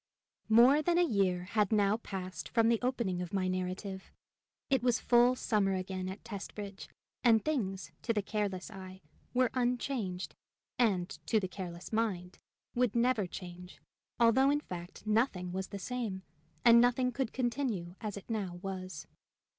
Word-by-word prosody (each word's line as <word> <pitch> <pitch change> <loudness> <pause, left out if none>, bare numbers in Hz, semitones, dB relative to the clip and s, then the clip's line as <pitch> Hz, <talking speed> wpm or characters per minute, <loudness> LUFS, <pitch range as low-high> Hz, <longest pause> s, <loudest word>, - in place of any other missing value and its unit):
More 245 +7 +7
than 345 +2 +2
a 350 - +5
year 195 - +1
had 205 +1 +1
now 205 0 +3
passed 185 -4 -6
from 230 -1 +3
the 230 -1 +3
opening 235 -8 -1
of 180 +1 -6
my 185 -1 +1
narrative. 185 +1 -3 0.6
It 265 -3 +2
was 245 0 +2
full 245 +1 +5
summer 205 -6 +1
again 185 0 -3
at 190 +2 -8
Testbridge, 205 -2 -7 0.4
and 225 -3 +5
things, 195 - -2
to 230 - 0
the 210 -3 0
careless 200 -1 -2
eye, 190 -2 -10 0.3
were 255 -1 +3
unchanged, 245 -6 -1 0.5
and, 195 -7 +3 0.2
to 220 - +3
the 190 - -2
careless 180 0 -7
mind, 190 -5 -1 0.3
would 245 -3 +1
never 235 -4 +2
change, 180 0 -9 0.4
although, 240 +4 +5
in 290 +1 +2
fact, 175 -3 -8
nothing 210 -5 +1
was 190 +1 -3
the 200 - -6
same, 205 -2 -4 0.4
and 235 0 +9
nothing 245 +1 +3
could 255 -1 -2
continue 240 -8 -2
as 210 -2 -4
it 200 - -10
now 205 -6 -3
was. 185 -1 -5
210 Hz, 155 wpm, -32 LUFS, 185-240 Hz, 0.6 s, and